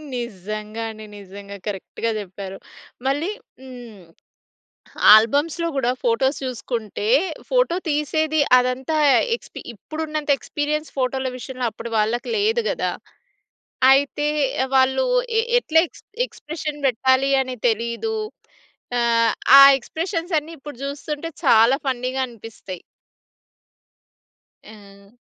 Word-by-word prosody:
నిజంగా 215 -1 -5
అండి. 215 0 -11
నిజంగా. 200 +1 -10
కరెక్ట్‌గా 210 +3 -3
చెప్పారు. 195 0 -8 0.5
మళ్ళీ 290 +7 0 0.3
హ్మ్. 240 -7 -11 1.1
ఆల్బమ్స్‌లో 290 +9 +2
గూడా 250 -2 +1
ఫోటోస్ 265 +4 +1
చూసుకుంటే, 230 -4 -4 0.4
ఫోటో - - +2
తీసేది 310 +1 0 0.2
అదంతా 255 +5 -1 0.4
ఎక్స్‌పి - - -12
ఇప్పుడు 310 +10 -8
ఉన్నంత 305 -1 -3
ఎక్స్‌పీరియన్స్ 300 +4 -3
ఫోటో‌ల 260 0 -1
విషయంలో 255 -1 -4
అప్పుడు 230 +2 -8
వాళ్ళకి 225 +3 0
లేదు 445 +3 +1
గదా! - - -1 1.0
అయితే 285 +2 +2 0.5
వాళ్ళు 265 - +3 0.3
ఎ - - +4 0.2
ఎట్లా 320 -7 +2
ఎక్స్‌ - - -19 0.2
ఎక్స్‌ప్రెషన్ 300 -7 -7
పెట్టాలి 260 +2 +2
అనే 255 -1 -4
తెలీదు. 235 - -2 0.8
ఆహ్, 230 -1 +2 0.3
ఆ - - +11 0.2
ఎక్స్‌ప్రెషన్స్ 335 - -3
అన్నీ 310 +3 -12
ఇప్పుడు 290 -3 -10
చూస్తుంటే 295 +3 -5 0.2
చాలా 230 +5 +5
ఫన్నీ‌గా 255 +1 -1
అనిపిస్తాయి. 225 -5 -10 1.8
ఆ! 200 -1 -16
255 Hz, 100 wpm, -22 LUFS, 225-300 Hz, 1.8 s, ఆ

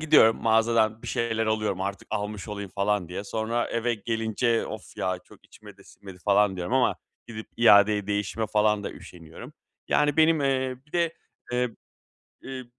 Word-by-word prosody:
gidiyorum, 150 -8 +5
mağazadan 110 0 +2
bir - - -9
şeyler 115 -1 -1
alıyorum 110 -3 -1
artık 100 +1 -4
almış 105 +1 -4
olayım 100 -2 -6
falan 100 -3 0
diye. 90 +3 -5
Sonra 110 +3 -2
eve 120 +1 0
gelince, 115 +1 -1
"Of - - -9
ya 95 +1 -1
çok - - -19
içime - - -15
de - - -19
sinmedi 95 -2 -13
falan." 100 -1 +3
diyorum 90 +5 -4
ama 130 -1 +3 0.3
gidip 110 -1 -7
iadeye 105 -2 +5
değişime 105 +2 -2
falan 105 -1 +1
da - - -3
üşeniyorum. 85 - -12 0.4
Yani, 145 -1 +2
benim, 160 0 +4
eee, 130 -2 0
bir 150 - -27
de, 170 -2 +1 0.4
eee, 125 0 0 0.7
ııı, 130 -1 -6
110 Hz, 165 wpm, -26 LUFS, 100-120 Hz, 0.7 s, gidiyorum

